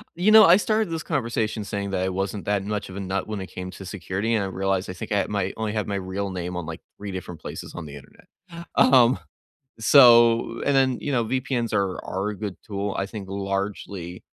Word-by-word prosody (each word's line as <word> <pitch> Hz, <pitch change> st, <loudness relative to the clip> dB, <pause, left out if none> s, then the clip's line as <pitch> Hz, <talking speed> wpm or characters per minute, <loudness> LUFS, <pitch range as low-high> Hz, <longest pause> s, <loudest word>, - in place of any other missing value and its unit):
you 185 Hz, +5 st, +3 dB
know, 220 Hz, -2 st, +10 dB
I 175 Hz, +3 st, +7 dB
started 215 Hz, -1 st, 0 dB
this 165 Hz, -1 st, -3 dB
conversation 115 Hz, -7 st, -1 dB
saying 100 Hz, -1 st, -4 dB
that 95 Hz, -1 st, 0 dB
I 95 Hz, -, 0 dB
wasn't 95 Hz, +2 st, -3 dB
that 100 Hz, -1 st, 0 dB
much 105 Hz, 0 st, -3 dB
of 95 Hz, -, -9 dB
a -, -, -5 dB
nut 95 Hz, 0 st, -3 dB
when 105 Hz, -2 st, -4 dB
it 95 Hz, -, -6 dB
came 95 Hz, 0 st, -7 dB
to 95 Hz, -, -10 dB
security, 100 Hz, +3 st, -3 dB
and 110 Hz, -, +1 dB
I 95 Hz, -, -2 dB
realized 95 Hz, 0 st, -1 dB
I -, -, -4 dB
think 90 Hz, -, -8 dB
I 100 Hz, -, +2 dB
might 100 Hz, -2 st, -1 dB
only 110 Hz, -1 st, -2 dB
have 105 Hz, -2 st, -2 dB
my 100 Hz, -, -2 dB
real 95 Hz, +1 st, -3 dB
name 90 Hz, 0 st, -4 dB
on, 90 Hz, -, -4 dB
like, 80 Hz, +1 st, -7 dB, 0.2 s
3 100 Hz, -1 st, -6 dB
different 90 Hz, -3 st, -7 dB
places -, -, -7 dB
on 85 Hz, -3 st, -6 dB
the 70 Hz, -1 st, -9 dB
Internet. 70 Hz, -, -15 dB, 0.5 s
Um, 130 Hz, -1 st, +5 dB, 0.6 s
so, 115 Hz, -2 st, +6 dB
and 140 Hz, -, +2 dB
then, 130 Hz, -2 st, +3 dB
you 145 Hz, -, -2 dB
know, 120 Hz, -3 st, +2 dB
VPNs 120 Hz, -1 st, -1 dB
are 95 Hz, -2 st, 0 dB
are 95 Hz, +3 st, -2 dB
a 105 Hz, -, -5 dB
good 105 Hz, -3 st, -5 dB
tool, 100 Hz, -1 st, -3 dB
I 95 Hz, -, 0 dB
think 100 Hz, -2 st, -8 dB
largely 100 Hz, -2 st, -4 dB
100 Hz, 230 wpm, -24 LUFS, 95-115 Hz, 0.6 s, know